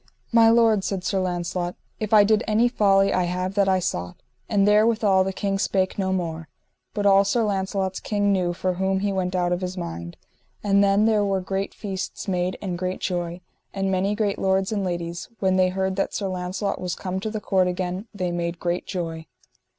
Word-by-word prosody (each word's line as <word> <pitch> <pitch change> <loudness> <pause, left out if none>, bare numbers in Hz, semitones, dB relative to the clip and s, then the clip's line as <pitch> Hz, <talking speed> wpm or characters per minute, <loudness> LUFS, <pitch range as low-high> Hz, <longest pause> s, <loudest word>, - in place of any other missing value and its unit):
My 230 -1 +6
lord, 225 -3 +4
said 190 -2 -2
Sir 195 +1 0
Launcelot, 175 -1 -2 0.2
if 215 -1 -3
I 215 -2 +7
did 215 +2 +3
any 220 +3 +3
folly 195 -4 +3
I 185 - +2
have 180 +2 -2
that 200 -1 +2
I 190 - +4
sought. 90 - -3 0.3
And 205 -2 +3
therewithal 210 -2 +4
the 195 - -2
king 195 0 -2
spake 190 0 0
no 190 -1 0
more. 165 -3 -3 0.5
But 205 - -1
all 195 0 +6
Sir 225 +4 +1
Launcelot's 195 -2 -1
kin 205 -1 0
knew 180 -2 +1
for 185 +1 -1
whom 190 +1 0
he 200 0 0
went 185 -1 -1
out 175 -1 +1
of 180 +1 0
his 185 0 -4
mind. 85 - -6 0.5
And 200 -1 +4
then 200 +1 +3
there 215 -2 +3
were 195 -1 +1
great 195 +1 -3
feasts 195 0 -5
made 180 -1 -1
and 180 -3 -3
great 185 0 -2
joy; 175 -1 -3 0.3
and 195 0 0
many 195 +2 +1
great 205 -2 -1
lords 190 +1 +1
and 205 -2 -1
ladies, 170 -1 -4
when 190 -1 +2
they 185 -1 +4
heard 190 +1 -2
that 195 - -1
Sir 200 - -2
Launcelot 185 +2 -3
was 180 -2 -2
come 185 0 -4
to 220 - -3
the 215 0 -3
court 190 -3 +1
again, 180 +3 -3
they 185 -4 -3
made 170 0 -2
great 175 0 -2
joy. 165 -3 -4
190 Hz, 205 wpm, -24 LUFS, 180-200 Hz, 0.5 s, I